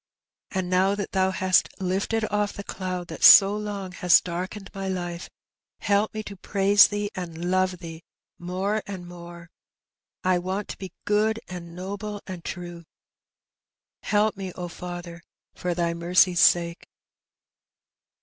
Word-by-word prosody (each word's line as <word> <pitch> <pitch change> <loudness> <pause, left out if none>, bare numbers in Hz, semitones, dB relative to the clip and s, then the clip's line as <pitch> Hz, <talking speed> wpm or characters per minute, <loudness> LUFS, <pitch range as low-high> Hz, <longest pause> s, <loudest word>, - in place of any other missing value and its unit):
And 190 -2 -2
now 185 +2 +2
that 205 -1 -4
Thoa 190 -1 +2
hast 185 -1 +2
lifted 195 +4 -1
off 210 0 0
the 200 - -7
cloud 185 -3 -5
that - - -7
so 200 0 +9
long 205 -3 -5
has 180 -1 +5
darkened 185 +3 -6
my 195 -1 -4
life^ 175 -2 -4 0.5
help 205 +1 +1
me 215 - -3
to 200 - -8
praise 200 +1 +5
Thee^ 205 0 -3
and 175 -2 -5
love 185 -1 +1
Thee 165 -1 -9 0.4
more 190 +4 -2
and 185 -3 -7
more. 170 -1 -11 0.7
I 185 -1 +2
want 190 +3 -4
to - - -6
be 190 -3 -7
good^ 215 +2 +2
and 170 -2 -8
noble^ 205 +3 -5
and 180 -3 -8
true. 175 -1 -7 1.2
Help 210 +1 +1
me, 190 -2 -6
O 180 -1 -6
Father, 175 -1 -8 0.3
for 180 -1 -3
Thy 170 -1 0
mercy's 175 +1 +3
sake.'' 170 0 +3
185 Hz, 145 wpm, -25 LUFS, 175-200 Hz, 1.2 s, so